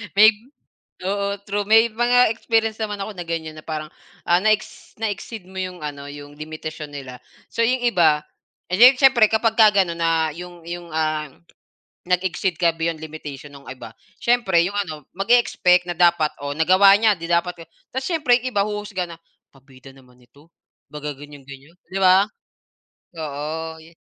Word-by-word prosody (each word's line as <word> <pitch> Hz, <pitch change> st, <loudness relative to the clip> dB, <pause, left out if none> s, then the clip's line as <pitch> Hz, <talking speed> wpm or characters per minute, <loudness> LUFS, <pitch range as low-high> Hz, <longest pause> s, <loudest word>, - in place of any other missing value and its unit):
May 215 Hz, +2 st, +8 dB, 0.8 s
oo, 200 Hz, +1 st, -1 dB
true. 205 Hz, 0 st, -2 dB
May 225 Hz, +1 st, +6 dB
mga 240 Hz, 0 st, +3 dB
experience 225 Hz, -1 st, 0 dB
naman 210 Hz, -2 st, -3 dB
ako 205 Hz, +2 st, -5 dB
na 175 Hz, -, -6 dB
ganyan 160 Hz, -2 st, -4 dB
na 155 Hz, -, -12 dB
parang, 155 Hz, -1 st, -5 dB, 0.4 s
ah, 175 Hz, -, +4 dB
na-ex 215 Hz, 0 st, -1 dB
na-exceed 215 Hz, -1 st, -4 dB
mo 190 Hz, 0 st, -9 dB
yung 185 Hz, -1 st, -5 dB
ano, 140 Hz, -1 st, -6 dB
yung 145 Hz, 0 st, -11 dB
limitasyon 155 Hz, 0 st, -7 dB
nila. 130 Hz, -3 st, -8 dB, 0.3 s
So, -, -, -5 dB
yung 250 Hz, +2 st, +1 dB
iba 165 Hz, -10 st, +3 dB, 0.5 s
eh, 185 Hz, -, 0 dB
di, 255 Hz, +2 st, +9 dB
siyempre 255 Hz, -5 st, +5 dB
kapagka 220 Hz, 0 st, +4 dB, 0.2 s
ganon 170 Hz, -1 st, -6 dB
na 165 Hz, -1 st, +1 dB
yung 175 Hz, +1 st, -11 dB
yung, 175 Hz, 0 st, -7 dB
ah, 155 Hz, -1 st, -1 dB, 0.8 s
nag-exceed 180 Hz, 0 st, 0 dB
ka 170 Hz, -2 st, +3 dB
beyond 165 Hz, -1 st, -2 dB
limitation 150 Hz, -3 st, -9 dB
nung 140 Hz, -1 st, -14 dB
iba. 130 Hz, 0 st, -9 dB, 0.3 s
Siyempre, 235 Hz, -8 st, +2 dB
yung 200 Hz, +3 st, -4 dB
ano 155 Hz, -8 st, -4 dB
mag-e-expect 195 Hz, -4 st, +3 dB
na 175 Hz, -, -3 dB
dapat 170 Hz, -3 st, +3 dB
o 145 Hz, 0 st, -4 dB
nagawa 185 Hz, +5 st, +6 dB
niya 220 Hz, +1 st, +3 dB
di 165 Hz, -, -6 dB
dapat, 170 Hz, 0 st, 0 dB
oh -, -, -37 dB, 0.2 s
tas 260 Hz, +1 st, -3 dB
siyempre 300 Hz, -8 st, +2 dB
'yong 255 Hz, -, -3 dB
iba 200 Hz, -, +2 dB
huhusga 210 Hz, -3 st, -4 dB
na, 170 Hz, -, -10 dB, 0.4 s
"Pabida 135 Hz, -1 st, -17 dB
naman 130 Hz, -2 st, -20 dB
ito." 140 Hz, +6 st, -22 dB, 0.4 s
Baga 150 Hz, 0 st, -5 dB
ganyan-ganyan, 140 Hz, +1 st, -13 dB, 0.2 s
di 195 Hz, -, -2 dB
ba? 190 Hz, +1 st, +6 dB, 1.0 s
Oo, 160 Hz, +2 st, -5 dB
yi 165 Hz, -, -17 dB
175 Hz, 165 wpm, -21 LUFS, 155-210 Hz, 1.0 s, di